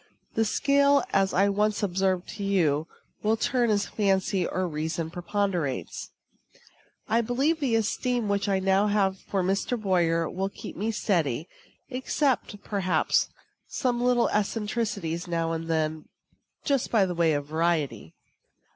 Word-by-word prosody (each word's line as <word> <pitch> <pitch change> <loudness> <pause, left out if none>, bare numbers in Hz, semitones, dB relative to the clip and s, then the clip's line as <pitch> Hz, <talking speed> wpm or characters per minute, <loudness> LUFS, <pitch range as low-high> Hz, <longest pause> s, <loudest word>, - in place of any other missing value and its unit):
The 225 - +2
scale, 280 +4 +3
as 195 -1 +3
I 195 +2 +3
once 210 +1 +1
observed 190 -1 0
to 205 - -6
you, 165 -6 +1 0.3
will 220 +1 +2
turn 240 +1 +1
as 205 -1 +2
fancy 195 -3 +1
or 185 0 -1
reason 160 +1 -3
preponderates. 175 -6 -2 1.0
I 225 +2 +3
believe 270 +8 +1
the 260 -6 +1
esteem 235 +1 0
which 200 0 0
I 195 - +2
now 195 +2 +2
have 195 -2 +1
for 195 -2 -2
Mr. 195 +6 0
Boyer 170 -5 +1
will 190 +4 -2
keep - - -9
me 215 +3 -2
steady; 165 - 0 0.4
except, 255 -4 -1
perhaps, 185 -6 +1 0.4
some 245 -2 -1
little 245 -1 +3
eccentricities 210 -5 -2
now 165 -1 -1
and 165 0 -3
then, 155 -1 -1 0.6
just 275 -3 +1
by 215 -4 +4
way 170 -3 +1
of 145 -1 -1
variety. 155 - -1
195 Hz, 140 wpm, -27 LUFS, 170-220 Hz, 1.0 s, by